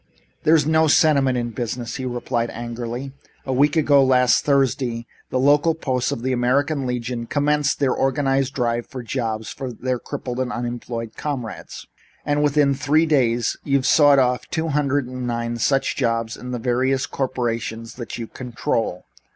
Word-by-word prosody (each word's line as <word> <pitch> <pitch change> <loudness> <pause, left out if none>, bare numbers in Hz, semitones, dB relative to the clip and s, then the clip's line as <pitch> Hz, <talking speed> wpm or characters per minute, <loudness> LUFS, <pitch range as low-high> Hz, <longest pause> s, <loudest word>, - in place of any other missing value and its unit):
"There 160 - +5
is 150 -3 +3
no 160 +1 +3
sentiment 140 -5 +4
in 120 -1 -2
business," 120 0 -4
he 130 - -4
replied 120 -1 -2
angrily. 120 +3 -5 0.3
"A 130 - -1
week 145 +4 +3
ago 145 -3 +5
last 125 -2 +4
Thursday 130 -4 +1 0.2
the - - -1
local 145 +4 +3
posts 130 -5 -1
of 115 - -4
the 130 0 0
American 135 +3 +1
Legion 120 -1 -3
commenced 145 +1 +1
their 135 -3 +2
organized 135 0 0
drive 120 -2 -1
for 130 -2 -7
jobs 110 -3 -3
for 130 -2 -5
their 125 +2 -3
crippled 125 +1 -5
and 130 -1 -1
unemployed 120 -1 -4
comrades, 130 -7 -5 0.4
and 145 0 +1
within 145 -1 +3
three 145 +4 +2
days 120 -7 +1
you've 140 -2 +1
sawed 145 -2 +6
off 125 -1 +1
two 160 -1 -2
hundred 145 -2 +1
and 125 0 -5
nine 120 0 -2
such 135 +4 +1
jobs 115 -3 -1
on 125 - -9
the 125 - -2
various 130 +2 0
corporations 115 -3 -3
that 120 -3 -7
you 115 - -4
control. 115 -6 -3
130 Hz, 165 wpm, -22 LUFS, 120-140 Hz, 0.4 s, sawed